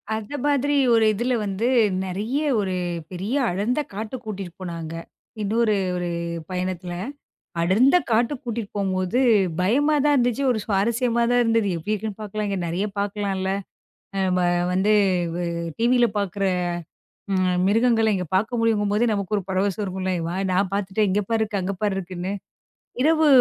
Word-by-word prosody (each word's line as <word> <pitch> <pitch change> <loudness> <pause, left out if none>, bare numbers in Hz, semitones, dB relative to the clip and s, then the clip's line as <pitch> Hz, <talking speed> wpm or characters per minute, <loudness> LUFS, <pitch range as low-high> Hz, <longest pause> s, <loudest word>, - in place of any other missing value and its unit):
அந்த 220 +6 -5
மாதிரி 285 0 +2 0.2
ஒரு 225 -1 +5
இதுல 240 +4 0
வந்து 200 +4 -1 0.4
நெறய 210 +9 -2 0.2
ஒரு 190 -2 -1 0.4
பெரிய 195 +9 -3 0.2
அடர்ந்த 215 +10 0
காட்டுக் 225 +4 -5
கூட்டிட்டு 195 -5 -6
போனாங்க. 165 -2 -5 0.5
இன்னொரு 215 +1 +2 0.2
ஒரு 175 0 -2 0.4
பயணத்துல. 180 -1 -3 0.7
அடர்ந்த 230 - +4
காட்டுக் 240 +5 +1
கூட்டிட்டு 230 -4 -4
போம்போது 190 +4 0 0.4
பயமாதான் 290 +8 +3
இருந்துச்சு. 245 +2 +1
ஒரு 225 - +1
சுவாரஸ்யமா 235 +4 +1
தான் 245 0 +4
இருந்தது. 225 -3 +2
எப்படி 205 +7 -2
இருக்கும்னு 215 0 -5
பாக்கலாம். 210 -1 -3
நெறய 180 +5 -1
பாக்கலாம்ல. 200 -2 -1 0.9
வ - - +2 0.3
வந்து 195 +3 +2 0.4
வ் 175 -1 -2 0.3
டிவில 240 +1 +4
பாக்குற 200 0 -2 0.9
ம் 185 -1 +2
மிருகங்கள 225 +1 +3
இங்க 180 -2 -2
பாக்க 220 +5 +1
முடியுங்கும் 210 -3 +2
போதே 230 +3 +2
நமக்கு 200 0 -2
ஒரு 200 - -1
பரவசம் 195 +2 0
இருக்கும்ல. 185 0 -2 0.4
நான் 190 +1 +1
பாத்துட்டேன், 200 +1 0
இங்க 205 +2 +2
பாரு 225 -1 +1
இருக்கு, 205 -2 -1
அங்க 195 +2 -2
பாரு 205 -2 +1
இருக்குன்னு. 185 +1 -4 0.7
இரவு 315 +1 +4
205 Hz, 140 wpm, -23 LUFS, 190-235 Hz, 0.9 s, ஒரு